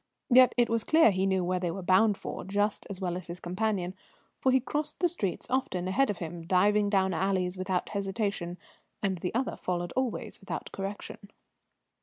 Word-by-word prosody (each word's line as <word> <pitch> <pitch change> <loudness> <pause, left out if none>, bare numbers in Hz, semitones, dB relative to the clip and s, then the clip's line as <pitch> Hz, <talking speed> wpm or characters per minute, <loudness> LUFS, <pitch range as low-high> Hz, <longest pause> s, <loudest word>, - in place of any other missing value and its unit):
Yet 255 +1 +7
it 240 -1 +4
was 230 -1 0
clear 315 -8 +5
he 190 0 +1
knew 190 -1 +1
where 180 +1 0
they 175 -1 -1
were 190 +3 -5
bound 195 +3 +4
for - - -6
just 205 +2 -1
as 195 -2 -5
well 180 -3 -2
as 180 -1 -6
his 175 +1 -7
companion, 185 0 -1 0.5
for 260 - +3
he 260 - +5
crossed 295 +4 -3
the 360 - +4
streets 205 - -2
often 250 -9 -1
ahead 270 +9 +2
of 205 - -1
him, 165 -1 -6
diving 205 +3 +3
down 190 -2 +2
alleys 185 +1 0
without 185 -1 -2
hesitation, 195 -3 -2 0.5
and 190 -3 0
the 180 - -2
other 255 +2 0
followed 175 -1 -3
always 255 -4 -2
without 195 - -6
correction. 200 +1 -6
195 Hz, 190 wpm, -29 LUFS, 180-220 Hz, 0.5 s, Yet